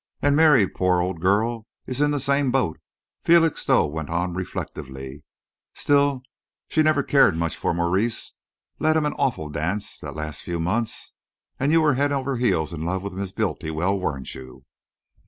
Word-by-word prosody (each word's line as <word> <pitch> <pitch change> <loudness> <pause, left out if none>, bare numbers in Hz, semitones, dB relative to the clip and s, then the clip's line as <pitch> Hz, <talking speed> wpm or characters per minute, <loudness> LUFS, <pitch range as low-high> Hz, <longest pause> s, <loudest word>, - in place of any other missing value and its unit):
"And 145 0 +2
Mary, 145 -10 +5
poor 90 -1 +1
old 90 -1 -2
girl, 110 +4 +1 0.2
is 130 +2 -3
in 150 - +4
the 145 -1 0
same 140 0 +2
boat," 125 -11 0 0.4
Felixstowe 165 - +4
went 75 0 -5
on 85 +2 -1
reflectively. 65 -6 -6 0.5
"Still, 140 -2 +2 0.4
she 155 - +2
never 155 -2 +3
cared 120 - +4
much 85 -1 -1
for - - -1
Maurice... 95 +7 -1 0.5
led 155 0 +3
him 155 - +1
an 150 - 0
awful 80 - 0
dance, 85 +8 -3
the - - -7
last 75 -1 -6
few 85 -1 -4
months. 110 +7 -2 0.5
And 140 +3 +1
you 165 0 +5
were 150 -2 +4
head 140 +3 +1
over 135 -1 -1
heels 85 -9 +1
in 80 - -5
love 90 +3 -2
with 100 -2 -5
Miss 95 0 -4
Bultiwell, 90 +3 -1
weren't 70 -7 -4
you?" 65 -1 -12
100 Hz, 170 wpm, -24 LUFS, 85-140 Hz, 0.5 s, Mary